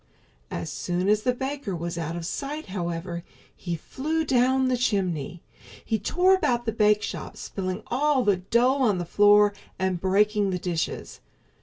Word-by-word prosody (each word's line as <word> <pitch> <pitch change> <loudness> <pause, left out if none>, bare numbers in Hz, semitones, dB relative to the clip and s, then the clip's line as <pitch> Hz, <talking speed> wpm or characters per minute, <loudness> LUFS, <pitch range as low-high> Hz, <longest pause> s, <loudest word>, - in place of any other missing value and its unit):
As 85 -1 -4
soon 180 +1 -2
as 210 +1 +3
the 250 - +2
baker 265 -6 -3
was 170 +1 -4
out 165 0 -3
of 170 -1 -5
sight, 285 - -4
however, 170 -2 -4 0.3
he 175 -2 -4
flew 310 - -2
down 260 0 +3
the 255 - +2
chimney. 180 - -1 0.4
He 220 - 0
tore 360 - +3
about 265 -10 +1
the 225 - 0
bakeshop, 210 -1 0
spilling 185 +1 -4
all 275 +1 +1
the 205 -4 +3
dough 240 +9 +2
on 215 -7 +3
the 175 - -3
floor 205 +3 +5 0.2
and 185 -2 -1
breaking 205 +2 +2
the 185 - -1
dishes. 175 -2 -3
205 Hz, 160 wpm, -26 LUFS, 180-255 Hz, 0.4 s, floor